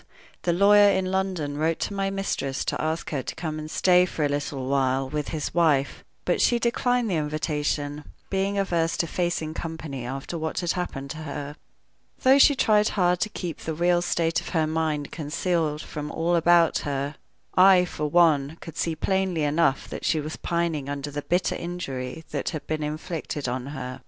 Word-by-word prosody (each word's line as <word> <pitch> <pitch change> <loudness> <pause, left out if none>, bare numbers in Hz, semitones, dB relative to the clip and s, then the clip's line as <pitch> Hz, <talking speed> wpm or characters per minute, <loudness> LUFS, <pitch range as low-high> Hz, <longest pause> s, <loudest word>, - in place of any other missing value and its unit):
The 175 - +1
lawyer 205 +3 +6
in 190 -1 0
London 180 -7 -1
wrote 160 +1 +1
to - - -2
my 195 0 -1
mistress 195 -9 -2
to - - -1
ask 160 +1 -2
her 140 -4 -1
to - - -6
come 155 -2 -4
and 155 0 -7
stay 180 +2 +4
for 155 -4 -1
a - - +1
little 145 -2 -3
while 135 -1 +1
with 150 +2 -3
his 155 -2 -3
wife; 155 -5 +2 0.2
but - - +1
she 240 - +4
declined 240 +1 +1
the 185 -5 0
invitation, 150 -1 -2 0.3
being 195 +1 0
averse 170 -4 0
to - - +1
facing 170 -2 -2
company 160 -6 -5
after 135 +7 -5
what 160 +3 -2
had 175 -2 0
happened 140 -7 -4
to 155 - -6
her. 145 -1 -6 0.7
Though 265 +2 +6
she 285 +1 +7
tried 215 -4 +3
hard 180 -1 +3
to 215 - 0
keep 175 -6 -5
the 160 - -4
real 175 +1 +3
state 165 -1 0
of - - -8
her 160 - +3
mind 155 -2 -1
concealed 155 0 -1
from 150 0 -6
all 170 +2 +1
about 170 0 +4
her, 140 0 -2 0.4
I, 185 -1 +7
for 150 -3 -3
one, 155 -2 +3
could 165 - -10
see 165 -1 0
plainly 190 -1 0
enough 145 -2 +2
that - - -6
she 160 - +2
was 155 +1 -5
pining 170 -5 -2
under 145 +1 -4
the 145 +1 -3
bitter 175 +4 0
injury 160 -5 -5
that 145 -3 -2
had 155 - -6
been 155 0 -2
inflicted 150 -1 -4
on 125 +1 -3
her. 130 -3 -6
160 Hz, 190 wpm, -25 LUFS, 145-180 Hz, 0.7 s, she